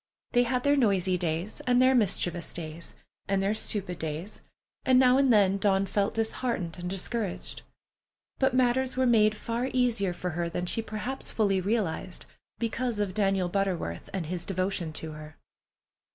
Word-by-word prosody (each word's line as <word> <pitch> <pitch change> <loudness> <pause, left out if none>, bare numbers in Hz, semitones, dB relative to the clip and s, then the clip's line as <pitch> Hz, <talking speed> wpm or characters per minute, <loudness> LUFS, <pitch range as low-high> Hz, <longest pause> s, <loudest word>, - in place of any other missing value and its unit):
They 245 - +4
had 250 -1 0
their 285 0 +4
noisy 195 -8 +2
days, 170 +3 -2
and 245 0 +4
their 255 +1 +5
mischievous 180 -7 +1
days, 165 0 -7 0.3
and 195 0 +1
their 200 +2 +2
stupid 195 -4 -3
days, 160 +6 -5 0.4
and 260 -1 +4
now 255 0 +6
and 270 -2 +4
then 200 -3 +4
Dawn 195 -1 +2
felt 200 +1 0
disheartened 220 -6 -2
and 180 0 -4
discouraged. 195 +1 -3 0.8
But 265 -1 +2
matters 255 +1 +2
were 260 - +3
made 215 -3 +4
far 235 +4 -2
easier 235 -7 +1
for 180 0 -4
her 170 +1 -2
than 175 +1 -3
she 225 - 0
perhaps 225 +5 -4
fully 200 -4 +1
realized, 190 -3 -2 0.3
because 235 0 -1
of 205 -3 -1
Daniel 195 -3 +1
Butterworth 180 - -2
and 185 -4 -3
his 175 +2 -4
devotion 185 -3 -1
to 160 0 -6
her. 155 0 -10
200 Hz, 165 wpm, -28 LUFS, 180-235 Hz, 0.8 s, now